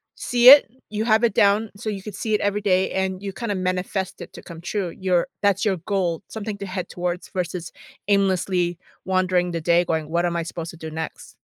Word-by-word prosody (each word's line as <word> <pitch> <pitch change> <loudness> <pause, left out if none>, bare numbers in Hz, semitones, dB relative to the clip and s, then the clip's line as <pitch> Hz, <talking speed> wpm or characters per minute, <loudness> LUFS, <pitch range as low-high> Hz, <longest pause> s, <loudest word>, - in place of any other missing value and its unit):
see 245 0 +5
it, 285 -5 +9 0.2
you 215 0 -2
have 220 0 +3
it 235 - +3
down 205 +3 +3
so 215 +2 -5
you 200 -2 -4
could 210 +1 -8
see 220 - -2
it 210 - +3
every 205 +1 0
day 190 -2 +2
and 190 0 -2
you 200 -1 -4
kinda 230 0 -3
manifest 185 +1 -2
it - - -9
to - - -10
come 165 -1 -10
true. 190 0 -2
Your 180 0 0
that's 200 -1 +2
your 195 -3 +1
goal. 175 -2 -1
Something 215 -1 -5
to 200 - -5
head 185 -1 -5
towards 180 0 -3
versus 180 -1 -4 0.4
aimlessly 185 -3 +1 0.3
wandering 185 -1 +1
the 165 -1 -3
day 170 +1 +3
going, 160 -2 -2
"What 170 +2 +1
am 170 -1 -1
I 170 - -1
supposed 165 0 -6
to 170 - -13
do 160 -1 -7
next?" 160 +1 -7
185 Hz, 220 wpm, -23 LUFS, 175-205 Hz, 0.4 s, it